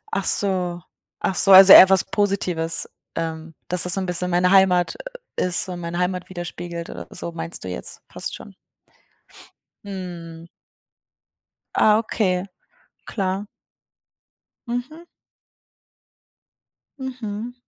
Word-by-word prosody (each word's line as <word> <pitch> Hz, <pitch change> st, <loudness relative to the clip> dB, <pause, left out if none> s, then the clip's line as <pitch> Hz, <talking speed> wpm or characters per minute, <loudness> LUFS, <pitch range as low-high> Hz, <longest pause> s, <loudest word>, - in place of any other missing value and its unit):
Ach 195 Hz, -, -1 dB
so. 180 Hz, -3 st, +1 dB, 0.4 s
Ach -, -, 0 dB
so, 195 Hz, -, +5 dB
also 190 Hz, 0 st, +10 dB
eher 190 Hz, -, +10 dB
was 190 Hz, -2 st, +5 dB
Positives, 180 Hz, -5 st, -1 dB, 0.3 s
ähm, 160 Hz, -1 st, -5 dB
dass 180 Hz, -1 st, 0 dB
das 180 Hz, -, +2 dB
so -, -, -1 dB
'n -, -, -3 dB
bisschen 180 Hz, 0 st, -2 dB
meine 180 Hz, +1 st, +2 dB
Heimat, 190 Hz, -2 st, +3 dB, 0.4 s
äh, -, -, +1 dB
ist 180 Hz, +1 st, 0 dB
und 180 Hz, -1 st, -6 dB
meine 170 Hz, 0 st, -5 dB
Heimat 180 Hz, 0 st, -2 dB
widerspiegelt 175 Hz, -1 st, -7 dB
oder -, -, -9 dB
so, 170 Hz, -, -6 dB
meinst 165 Hz, 0 st, -4 dB
du -, -, -7 dB
jetzt 90 Hz, -, -7 dB
fast -, -, -5 dB
schon. -, -, -13 dB, 1.3 s
Mhm. 175 Hz, -4 st, -8 dB, 1.3 s
Ah, 210 Hz, 0 st, +4 dB
okay. 190 Hz, -5 st, -1 dB, 0.6 s
Klar. 195 Hz, -1 st, -3 dB, 1.2 s
Mhm. 245 Hz, +8 st, -5 dB, 2.0 s
Mhm. 245 Hz, -3 st, -6 dB
180 Hz, 120 wpm, -22 LUFS, 175-200 Hz, 2.0 s, also